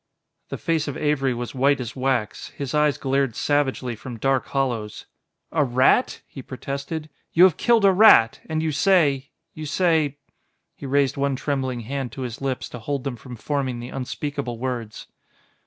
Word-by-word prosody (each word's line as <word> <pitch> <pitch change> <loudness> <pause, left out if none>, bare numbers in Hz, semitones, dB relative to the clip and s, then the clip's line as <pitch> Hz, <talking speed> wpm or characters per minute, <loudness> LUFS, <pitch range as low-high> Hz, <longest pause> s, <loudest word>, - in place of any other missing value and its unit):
The - - -4
face 165 -3 -1
of 145 - -4
Avery 145 -3 +1
was 120 -1 -4
white 140 +2 +2
as 120 -3 -5
wax; 130 -5 -1
his 140 -3 -4
eyes 150 -1 +2
glared 135 -3 0
savagely 135 -4 0
from 120 +2 -8
dark 135 +2 0
hollows. 120 -6 -2 0.5
"A 155 - +2
rat!" 130 - +2
he 135 - -10
protested. 140 +4 -5 0.3
"You 170 - +6
have 185 -5 +6
killed 230 -4 +3
a 195 - +7
rat... 185 - +6
and 160 0 -1
you 160 - 0
say 145 -4 +2 0.2
you 155 -1 -6
say 155 -3 +1 0.3
" - - -50
He - - -6
raised 140 0 +1
one 140 -1 0
trembling 130 -3 -2
hand 130 +2 -4
to 135 - -7
his 120 +1 -6
lips 135 -2 -2
to 125 - -8
hold 140 +3 -3
them 135 -3 -3
from 125 +1 -10
forming 130 0 -2
the 120 +1 -7
unspeakable 135 -1 -4
words. 120 -3 -4
135 Hz, 175 wpm, -23 LUFS, 125-150 Hz, 0.5 s, a